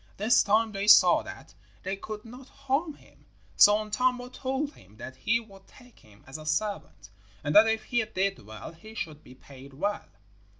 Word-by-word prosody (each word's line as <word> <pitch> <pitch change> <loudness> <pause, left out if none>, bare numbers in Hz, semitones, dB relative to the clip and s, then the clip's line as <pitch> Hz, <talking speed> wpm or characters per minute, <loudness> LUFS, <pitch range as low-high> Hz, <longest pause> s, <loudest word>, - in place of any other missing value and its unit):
This 225 +4 +4
time 220 +2 +2
they 200 0 -4
saw - - +7
that - - -11 0.3
they 190 +1 -3
could 210 +2 -8
not 250 +3 -12
harm 275 +3 -2
him, - - -23 0.3
so 205 0 +7
Untamo 245 +4 -1
told 270 +3 -3
him 100 +3 -20
that 130 +3 -9
he 220 - 0
would 195 -4 -16
take 250 -2 -19
him 105 -1 -21
as 135 +4 -9
a 155 - -11
servant, 175 - -3 0.3
and 145 - -2
that 215 +2 +8
if 220 0 0
he 240 -2 0
did 195 -1 -2
well 110 +4 -10
he 215 +7 -14
should 155 -7 -6
be 125 - -15
paid 135 0 -15
well. 205 +7 -2
210 Hz, 185 wpm, -27 LUFS, 155-235 Hz, 0.3 s, that